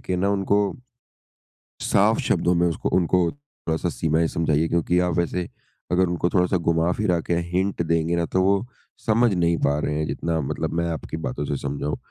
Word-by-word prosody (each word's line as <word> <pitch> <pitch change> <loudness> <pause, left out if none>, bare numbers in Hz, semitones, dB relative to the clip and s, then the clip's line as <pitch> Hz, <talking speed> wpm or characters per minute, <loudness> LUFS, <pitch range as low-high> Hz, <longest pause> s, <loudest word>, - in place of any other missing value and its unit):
कि 90 - -2
ना 95 +2 +1
उनको 100 0 +1 1.2
साफ - - +3
शब्दों 90 - +2
में 85 0 +3
उसको 80 - -2
उनको 90 0 +2
थोड़ा-सा 90 - -4
सीमाएँ 80 0 +1
समझाइए 80 -1 +1
क्योंकि 85 +1 +1
आप 90 -1 +1
वैसे 85 0 -1 0.4
अगर 90 +1 +3
उनको 85 0 0
थोड़ा-सा 90 0 +2
घुमा-फिरा 85 +3 +1
के 85 - -2
अ, 85 - +1
हिंट 95 0 0
देंगे 85 +1 +1
ना 85 -1 0
तो 95 +2 0
वो 100 +3 +2 0.4
समझ 115 0 +3
नहीं 85 -2 +2
पा 70 +1 +2
रहे 75 - -1
हैं 75 - 0
जितना 85 -1 -2
मतलब 70 - -3
मैं 85 0 0
आपकी 80 0 -5
बातों 70 +4 -3
से 70 - -2
समझा 70 +1 -4
हूँ। 75 - -2
85 Hz, 190 wpm, -23 LUFS, 80-90 Hz, 1.2 s, साफ